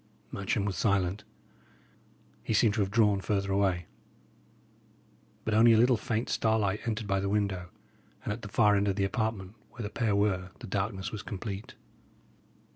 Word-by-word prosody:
Matcham 100 +1 -1
was 100 -2 -2
silent. 100 -2 0 1.2
He 110 - -1
seemed 105 -1 +4
to 110 - -2
have 95 - 0
drawn 105 -2 +3
further 100 -1 -1
away. 95 -3 +1 1.6
But 110 - 0
only 115 +2 +6
a - - +5
little 125 +2 +5
faint 115 +1 -2
starlight 105 -2 +1
entered 110 -1 -2
by 100 -1 0
the 100 0 -1
window, 100 -4 -1 0.5
and - - -2
at 115 - -8
the 105 - -7
far 105 0 +4
end 100 0 +1
of 100 - +1
the 100 -1 +1
apartment, 105 -2 -2 0.2
where 120 - -6
the 105 - -5
pair 110 -4 0
were, 95 -3 +1
the - - -8
darkness 95 -1 -2
was 105 - -5
complete. 100 0 -6
105 Hz, 170 wpm, -29 LUFS, 95-110 Hz, 1.6 s, only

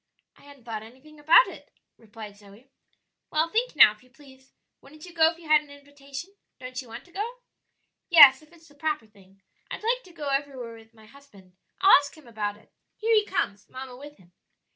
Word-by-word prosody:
"I - - -23
hadn't 285 -3 -17
thought 225 -2 -6
anything 260 +7 -16
about 325 +10 +6
it," - - -12 0.3
replied 215 -2 -12
Zoe. 205 +6 -19 0.6
"Well, 315 +2 +1
think 470 +3 -1
now, 280 - +8
if 215 - -17
you 255 - -23
please; 265 0 -20 0.3
wouldn't 305 +3 -15
you 350 - -13
go 320 -1 +4
if 330 - -15
you 335 -2 -15
had 305 -1 +5
an 295 - -19
invitation? 285 +4 -11 0.3
Don't 255 0 -7
you 255 - -15
want 225 - -10
to 355 - -22
go?" 425 +6 -4 0.8
"Yes, 290 -6 +8
if 310 +1 -22
it's 335 -1 -20
the 290 - -21
proper 300 -3 -3
thing; 195 -2 -24 0.3
I'd - - -7
like 485 +3 0
to 365 - -16
go 300 -4 -6
everywhere 275 -4 -3
with 225 0 -18
my 220 -1 -18
husband. 215 -7 -19 0.3
I'll 385 +1 +8
ask 285 +2 -9
him 310 - -17
about 210 -3 -4
it. - - -26 0.2
Here 455 +1 0
he 425 -1 +4
comes, 205 - -3
mamma 260 -1 -9
with 290 +3 -13
him." 180 -2 -23
280 Hz, 210 wpm, -26 LUFS, 225-315 Hz, 0.8 s, now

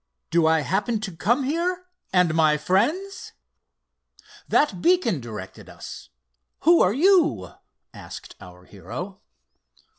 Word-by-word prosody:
"Do 165 -1 +3
I 160 -1 +3
happen 205 +8 -1
to 195 -5 -6
come 240 - +1
here—and 340 - -1
my 155 -2 +3
friends? 300 - -1 1.1
That 205 -12 +1
beacon 355 - +2
directed 105 -5 -9
us; - - -10 0.5
who 335 +2 +5
are 185 - +4
you?" 285 - +3 0.4
asked - - -11
our 90 0 -14
hero. 120 - -8
190 Hz, 110 wpm, -24 LUFS, -, 1.1 s, who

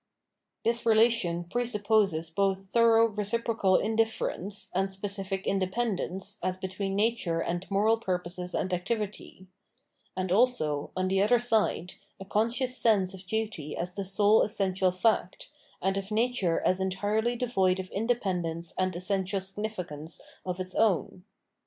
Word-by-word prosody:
This 235 +1 +1
relation 220 -6 +3
presupposes 205 -5 +1
both 195 +2 0
thorough 230 -1 +5
reciprocal 215 -2 0
indifference 220 -3 -1
and 195 +1 0
specific 195 0 -3
independence 195 0 -1
as 185 +1 -1
between 190 +1 -3
nature 205 -6 +1
and 175 +2 -3
moral 210 +3 +3
purposes 180 -3 -3
and 185 - -1
activity; 195 0 -4 0.7
and 185 -1 -2
also, 185 - +2
on 185 0 +1
the 190 +1 +2
other 215 +4 +4
side, 220 -7 +1 0.3
a 195 - -8
conscious 235 +6 0
sense 205 -6 +2
of 190 0 -11
duty 210 -8 -3
as 180 +1 -3
the 200 - -3
sole 205 +3 +4
essential 190 -2 +1
fact, 185 0 0 0.3
and 195 +1 +1
of 195 0 -4
nature 215 -6 +1
as 185 - +2
entirely 205 +5 0
devoid 195 -7 +1
of 185 0 -6
independence 180 -7 -1
and 185 -1 0
essential 190 +1 0
significance 185 -6 -5 0.2
of 180 0 -4
its 185 0 -4
own. 190 -3 +1
195 Hz, 135 wpm, -28 LUFS, 185-220 Hz, 0.7 s, thorough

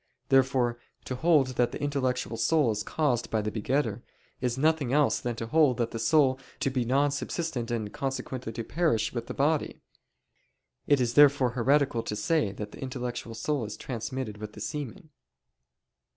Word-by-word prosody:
Therefore 130 -3 +3 0.3
to - - -4
hold 150 -1 +3
that 120 -1 +2
the - - -6
intellectual 130 -5 -1
soul 145 +1 +2
is 105 -1 -2
caused 130 -2 0
by 110 - 0
the 105 - -2
begetter, 115 0 -1 0.4
is 125 -1 -1
nothing 155 -3 +2
else 150 +1 +3
than 120 -1 -3
to 115 - -4
hold 145 -1 +3
the 115 -1 -2
soul 135 +1 +3 0.2
to 135 - 0
be 130 -2 0
non 140 +4 +2
subsistent 145 -4 -3
and 110 -3 -3
consequently 130 -3 -4
to 115 - -4
perish 155 -3 0
with 120 -1 -4
the - - -6
body. 150 +2 0 1.0
It 145 -2 +4
is 120 -2 0
therefore 140 -3 +6
heretical 130 0 +2
to 105 - -4
say 105 +2 +1
that 105 +1 -7
the - - -12
intellectual 125 -3 -5
soul 135 +4 -1
is 105 -1 -6
transmitted 120 -3 -5
with 105 0 -7
the - - -11
semen. 150 - -6
130 Hz, 170 wpm, -28 LUFS, 115-145 Hz, 1.0 s, therefore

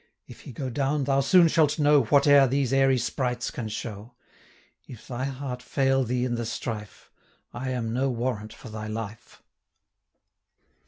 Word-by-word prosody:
If - - -13
he - - -10
go 130 +2 -5
down, 140 +3 0
thou 135 0 +1
soon 170 +5 +5
shalt 155 -2 +2
know 145 -2 +4
430 140 +5 +4
Whate'er 140 -1 +7
these 135 0 0
airy 135 -1 +4
sprites 125 0 -2
can 110 -3 -5
show: 110 +2 -7 0.7
If 120 -3 -12
thy 130 0 -3
heart 135 -2 -5
fail 135 0 +1
thee 125 +1 -1
in 125 - -2
the 120 -1 -2
strife, 110 -3 -6 0.4
I 125 +2 -4
am 115 -3 -2
no 135 +2 0
warrant 115 -3 -3
for 125 - -12
thy 110 0 -6
life." 110 0 -7
125 Hz, 165 wpm, -26 LUFS, 115-135 Hz, 0.7 s, Whate'er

